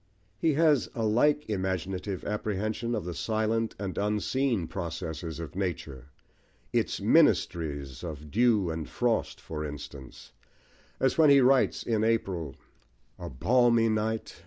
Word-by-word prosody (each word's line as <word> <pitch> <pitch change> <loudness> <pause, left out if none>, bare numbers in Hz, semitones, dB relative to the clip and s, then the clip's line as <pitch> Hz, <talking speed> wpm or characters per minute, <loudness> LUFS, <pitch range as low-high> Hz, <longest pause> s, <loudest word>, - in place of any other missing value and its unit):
He 160 -3 +2
has 155 -4 +3
a 115 - -1
like 145 +7 +2
imaginative 95 -1 -3
apprehension 110 +3 -2
of 105 - -4
the 90 - -4
silent 110 +3 -1
and 100 -2 -4
unseen 105 +1 0
processes 80 -2 -5
of 85 0 -7
nature, 80 -9 -4 0.7
its - - 0
"ministries" 70 -5 +2
of 75 -3 -7
dew 110 -6 +3
and 80 -1 -5
frost, 120 -2 -1
for 75 -1 -6
instance; 70 -4 -9 0.7
as 130 +4 +1
when 155 -2 +7
he 140 -1 +7
writes, 130 0 +3
in 110 -2 0
April 95 -10 -1 0.6
A - - -6
balmy 115 - +3
night! 110 +1 -2
105 Hz, 130 wpm, -28 LUFS, 80-115 Hz, 0.7 s, when